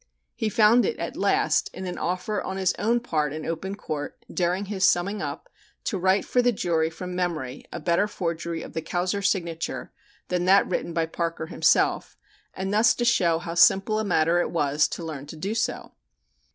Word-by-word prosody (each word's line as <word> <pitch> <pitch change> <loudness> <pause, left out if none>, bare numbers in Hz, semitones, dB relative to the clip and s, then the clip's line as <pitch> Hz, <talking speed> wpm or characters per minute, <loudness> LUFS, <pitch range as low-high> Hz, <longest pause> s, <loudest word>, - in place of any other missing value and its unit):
He 220 -3 -2
found 225 +2 +5
it 460 - -1
at - - -4
last - - +2
in 190 - -6
an 180 - -5
offer 185 +4 -2
on 190 - -4
his 190 -1 +1
own 230 +4 +2
part 155 - -1
in 155 +1 -6
open 190 +4 -3
court 155 -7 -6
during 180 +3 0
his 195 -1 -3
"summing 190 +3 +2
up" - - -5 0.4
to 220 - -2
write 190 +2 +2
for 250 - +2
the 245 0 +3
jury 165 -6 0
from 180 +2 -7
memory 155 -8 -3
a 175 - -5
better 170 +6 +2
forgery 170 -4 -3
of - - -10
the 160 - -2
Kauser 180 +4 -1
signature 170 -4 -2 0.4
than 180 -1 0
that 195 +2 +6
written 175 -1 -2
by 165 0 0
Parker 165 0 -3
himself, - - +1 0.4
and 190 +1 -3
thus 220 +1 +4
to 240 - -1
show 180 -9 +3
how 165 0 -5
simple 195 +5 +4
a - - 0
matter 170 -3 +2
it - - -1
was 150 -2 +2
to 170 - -6
learn 145 -3 -6
to 160 - -9
do 195 +7 -3
so. 230 +1 -2
180 Hz, 195 wpm, -25 LUFS, 165-200 Hz, 0.4 s, that